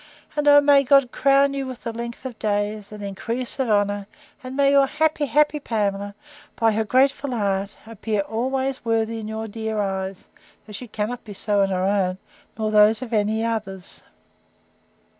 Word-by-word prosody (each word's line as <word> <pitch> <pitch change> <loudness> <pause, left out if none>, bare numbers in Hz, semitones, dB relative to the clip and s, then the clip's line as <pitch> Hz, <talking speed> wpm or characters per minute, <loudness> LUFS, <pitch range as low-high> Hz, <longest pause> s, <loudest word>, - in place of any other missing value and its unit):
And 295 -1 0
oh, 290 0 +8
may 285 -1 +5
God 275 -2 +4
crown 275 +1 +3
you 275 -1 -3
with 255 -1 -9
length 235 +2 -6
of 250 -3 -7
days, 205 0 -2
and 210 -1 -8
increase 230 +7 -4
of 260 -3 0
honour; 205 -1 +1 0.4
and 255 +1 -7
may 280 -1 +4
your 280 -1 +5
happy, 310 0 0
happy 300 +1 +2
Pamela, 205 -5 -2 0.4
by 225 -2 +2
her 220 +1 0
grateful 270 +5 +2
heart, 200 -2 -1
appear 220 -1 -2
always 260 +5 -2
worthy 225 0 0
in 215 - -6
your 220 +1 -4
dear 220 0 -4
eyes, 190 -1 -3 0.4
though 210 - -12
she 245 +4 -7
cannot 220 +3 -4
be 210 - -9
so 205 +1 0
in 195 - +2
her 185 -1 -1
own, 190 -2 +1 0.4
nor 215 -1 -1
in - - -4
those 210 +2 +5
of 240 -2 -8
any 220 +1 +1
others! 195 -5 -5
220 Hz, 180 wpm, -23 LUFS, 205-260 Hz, 0.4 s, oh